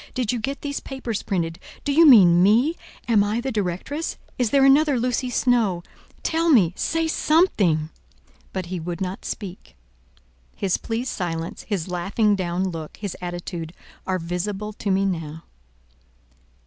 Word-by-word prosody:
Did 250 -5 0
you 245 - -2
get 275 +6 -4
these 285 -1 -3
papers 250 -6 -4
printed? 165 -3 -2 0.2
Do 285 - 0
you 320 +3 +6
mean 180 -10 +8
me? 235 - +4 0.3
Am 220 -4 +4
I 210 +3 -1
the 265 +2 -3
directress? 210 - -3 0.2
Is 245 -3 +2
there 275 +1 +4
another 280 -1 +5
Lucy 250 +1 -1
Snowe? 230 -8 +1 0.4
Tell 330 +1 +1
me: 195 - +5
say 325 0 0
something." 200 - +2 0.6
But 190 -2 -3
he 180 +1 -4
would 170 +1 -5
not 190 0 -4
speak. 190 -3 -7 0.8
His 190 -2 0
pleased 235 +3 -3
silence, 165 -2 -4
his 195 -6 -1
laughing 195 +4 +1
down 185 0 -1
look, 160 -3 -7
his 200 -3 -5
attitude, 175 -2 -5 0.3
are 185 -1 +1
visible 190 +5 -4
to 205 - -4
me 195 +1 +2
now. 160 -4 -3
200 Hz, 150 wpm, -23 LUFS, 175-250 Hz, 0.8 s, mean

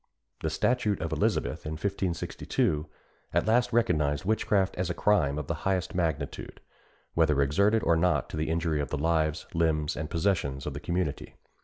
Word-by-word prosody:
The - - -1
statute 110 -5 +1
of - - -3
Elizabeth, - - 0
in 75 - -4
1562, 85 -3 -1 0.5
at - - +3
last 120 +3 +3
recognised 75 - +1
witchcraft 105 -2 +1
as 90 0 -2
a 85 - -2
crime 75 -9 +2
of 75 - -3
the 85 - -2
highest 95 -2 0
magnitude, 85 -4 -2 0.5
whether 75 -3 +3
exerted 100 +11 +3
or 85 - +4
not 85 +2 +2
to - - -5
the 80 +1 -1
injury 80 -2 0
of 70 - -4
the 75 - -2
lives, 80 +1 0
limbs, 80 -2 +1
and 75 0 -4
possessions 80 -7 0
of 75 - -3
the 70 - -5
community. 85 -2 -3
85 Hz, 170 wpm, -28 LUFS, 75-95 Hz, 0.5 s, or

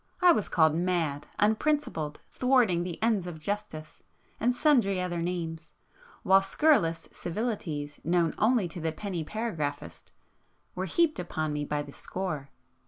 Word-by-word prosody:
I 360 -2 +7
was 215 - +1
called 160 -2 +4
'mad,' 165 -4 -1
'unprincipled,' 215 - 0
'thwarting 250 -9 +3
the 175 -1 -4
ends 215 -6 +2
of 175 -2 -6
justice,'—and 205 +5 -4
sundry 245 -10 +3
other 175 -2 -2
names, 165 -3 -4 0.5
while 195 +1 +6
scurrilous 195 - +2
civilities 165 -7 -4
known 170 -1 +2
only 220 -3 +3
to 165 +1 -6
the 160 0 0
penny 180 -2 -4
paragraphist 155 -8 -4 0.6
were 185 +1 -3
heaped 320 - +2
upon 155 -3 -2
me 150 0 -2
by 145 0 -2
the 140 -1 -12
score. 155 -7 -4
175 Hz, 135 wpm, -29 LUFS, 160-215 Hz, 0.6 s, I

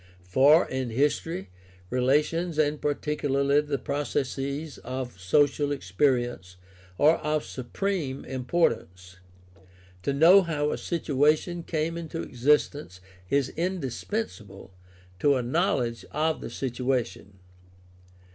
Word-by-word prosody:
For, 135 - +5
in 130 -2 -3
history, 145 - -1 0.4
relations 150 +6 +1
and 150 -1 +1
particularly 145 -1 +1
the 150 -1 -2
processes 140 +1 -3
of 125 -4 -6
social 145 +9 +2
experience 120 -4 0 0.4
are 155 +3 +5
of 150 0 -1
supreme 140 +2 -3
importance. 115 - -1 0.8
To 115 - -1
know 165 +8 +7
how 150 -4 -1
a - - -2
situa 150 -3 +2
tion 175 +1 -6
came 165 +1 -2
into 165 0 -5
existence 135 - 0 0.3
is 140 -2 +1
indispensable 160 - -4 0.5
to 140 +4 +4
a 125 - -1
knowledge 130 -4 0
of 155 +1 0
the - - -6
situation. 125 -6 -3
140 Hz, 105 wpm, -27 LUFS, 125-155 Hz, 0.8 s, know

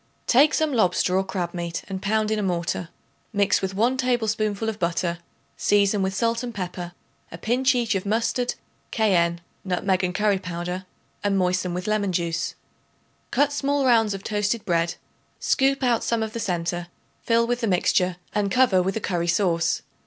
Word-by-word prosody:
Take 285 +5 +5
some 310 -2 +1
lobster 185 -4 +2
or 190 - +3
crab 180 -3 -3
meat 170 -1 -4
and 190 -1 -5
pound 215 +2 +1
in 215 - +1
a - - 0
mortar. 175 -2 -2 0.4
Mix 205 -2 +2
with 190 0 -3
1 240 +6 +2
tablespoonful 220 -4 0
of 220 -1 -3
butter; 170 0 -1 0.4
season 205 0 +3
with 190 0 -1
salt 230 +3 +1
and 240 -3 -6
pepper, 180 -2 -5 0.4
a 165 - -7
pinch 255 +8 +2
each 235 -2 +1
of 190 -2 -1
mustard, 230 +4 0 0.4
cayenne, 170 -6 +2 0.2
nutmeg 185 0 0
and 180 0 -1
curry 205 -1 +2
powder 180 +1 -5 0.4
and 200 -1 +1
moisten 180 -1 0
with 180 +1 -4
lemon 215 -2 0
juice. 170 -1 -1 0.7
Cut 285 +1 +2
small 285 -1 0
rounds 225 -5 +4
of 195 - -8
toasted 210 +1 -1
bread; 170 -1 +1 0.4
scoop 275 0 +2
out 240 -3 +2
some 230 -1 0
of 220 -1 -5
the 230 - -4
centre; 175 -3 -2 0.3
fill 230 0 +2
with 245 +1 -1
the 230 - 0
mixture 180 -1 +2 0.2
and 205 -1 +1
cover 230 -5 +4
with 190 +1 -1
a - - 0
curry 175 -5 -1
sauce. 170 -2 +1
200 Hz, 175 wpm, -24 LUFS, 180-230 Hz, 0.7 s, Take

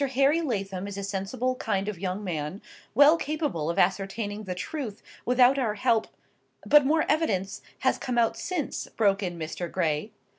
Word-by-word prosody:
Harry 280 +5 +4
Lathom 195 - -3
is 200 -1 -6
a 200 - -4
sensible 200 +6 -2
kind 200 -5 -1
of 210 -5 -4
young 190 +2 -3
man, 160 0 -3 0.4
well 290 +5 +7
capable 295 - -2
of 170 - -2
ascertaining 205 +3 0
the 180 -1 -4
truth 230 - -5 0.2
without 250 +2 +5
our 220 -5 0
help—" 220 +1 +2 0.6
"But 295 -2 +6
more 315 +2 +3
evidence 210 - 0 0.2
has 260 - +2
come 250 -2 -3
out 230 -1 +3
since," 345 -6 -3
broke 200 -2 +3
in 175 -3 -3
Mr. 170 +2 -5
Gray. 165 +1 0
210 Hz, 170 wpm, -27 LUFS, 190-265 Hz, 0.6 s, well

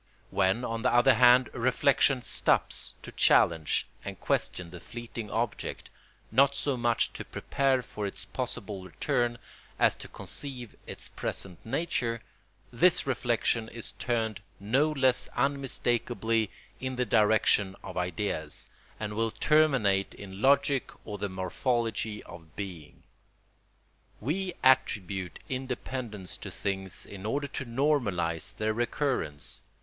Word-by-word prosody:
When 95 +6 +2
on 115 0 -2
the 125 - +2
other 120 +2 +6
hand 125 0 +6
reflection 130 +1 +3
stops - - +1
to - - -8
challenge 80 -3 +4 0.2
and - - -6
question 90 -2 -1
the 90 - -8
fleeting 115 +1 -7
object, 115 0 -3 0.4
not 140 +4 +5
so 140 -1 0
much 120 -1 +1
to - - -5
prepare 135 -2 0
for 105 -3 -4
its 100 0 -4
possible 100 -2 -4
return 120 +5 0 0.4
as - - +5
to - - -9
conceive 125 -5 -6
its - - -6
present 90 -3 -5
nature, 120 -3 -1 0.5
this 170 +10 +4
reflection 120 -3 +1
is 115 -1 -7
turned 110 -4 -1 0.2
no 130 +10 +2
less 130 -4 +3
unmistakably 120 -4 +1 0.3
in 130 0 -3
the 125 0 +1
direction 105 -2 +3
of - - -7
ideas, 90 -3 -3 0.3
and 105 -1 -3
will 115 +1 +1
terminate 125 -10 +3
in 95 0 -9
logic 140 0 +3 0.2
or 105 -1 -5
the 100 - -2
morphology 110 +3 -1
of 80 -3 -13
being. 90 -7 -7 1.2
We 180 - -1
attribute 100 -9 +2
independence 125 -6 -4
to - - -7
things 95 -2 -3
in 100 -2 -9
order 140 +7 -1
to 135 - -4
normalise 105 - 0
their 110 0 0
recurrence. 120 - -1
115 Hz, 125 wpm, -29 LUFS, 100-130 Hz, 1.2 s, other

